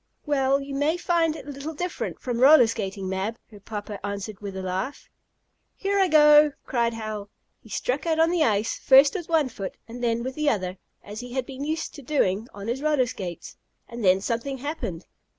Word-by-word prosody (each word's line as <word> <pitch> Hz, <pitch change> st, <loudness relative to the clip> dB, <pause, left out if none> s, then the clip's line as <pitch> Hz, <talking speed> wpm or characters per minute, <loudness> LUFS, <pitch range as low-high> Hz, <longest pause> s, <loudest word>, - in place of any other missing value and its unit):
"Well, 275 Hz, -2 st, +2 dB
you 280 Hz, 0 st, -7 dB
may 290 Hz, +5 st, +1 dB
find 335 Hz, -3 st, +1 dB
it -, -, -9 dB
a 290 Hz, -, -6 dB
little 285 Hz, +3 st, -6 dB
different 355 Hz, +3 st, -4 dB
from 245 Hz, -2 st, -3 dB
roller 275 Hz, 0 st, +8 dB
skating, 195 Hz, -4 st, -3 dB
Mab," 190 Hz, +4 st, -2 dB
her 205 Hz, -, -13 dB
papa 205 Hz, -1 st, -7 dB
answered 200 Hz, 0 st, -5 dB
with 200 Hz, -2 st, -6 dB
a 190 Hz, -, -4 dB
laugh. 190 Hz, +9 st, -4 dB, 0.7 s
"Here 400 Hz, +1 st, 0 dB
I 380 Hz, -, +4 dB
go!" 300 Hz, -2 st, +7 dB
cried 235 Hz, -2 st, 0 dB
Hal. 215 Hz, -2 st, -5 dB, 0.3 s
He 220 Hz, -, -17 dB
struck 260 Hz, -, -2 dB
out 320 Hz, -1 st, +2 dB
on 325 Hz, +1 st, +4 dB
the 345 Hz, -3 st, +2 dB
ice, 215 Hz, -1 st, +1 dB
first 275 Hz, +1 st, +6 dB
with 345 Hz, -4 st, -5 dB
one 320 Hz, -4 st, +3 dB
foot, 195 Hz, -5 st, -6 dB
and 240 Hz, +2 st, -8 dB
then 235 Hz, 0 st, +1 dB
with 260 Hz, +1 st, -4 dB
the 305 Hz, +1 st, +1 dB
other, 185 Hz, -5 st, -2 dB, 0.3 s
as 210 Hz, +1 st, -8 dB
he 245 Hz, 0 st, -8 dB
had 260 Hz, -1 st, -1 dB
been 270 Hz, +1 st, -7 dB
used 315 Hz, +2 st, -3 dB
to 290 Hz, -, -10 dB
doing 230 Hz, -7 st, 0 dB
on 200 Hz, +1 st, -8 dB
his 245 Hz, +4 st, -2 dB
roller 300 Hz, -4 st, +2 dB
skates. 185 Hz, -8 st, -7 dB, 0.3 s
And 235 Hz, -1 st, -7 dB
then 190 Hz, 0 st, +4 dB
something 240 Hz, +5 st, -2 dB
happened. 250 Hz, -, -5 dB
245 Hz, 205 wpm, -25 LUFS, 205-295 Hz, 0.7 s, roller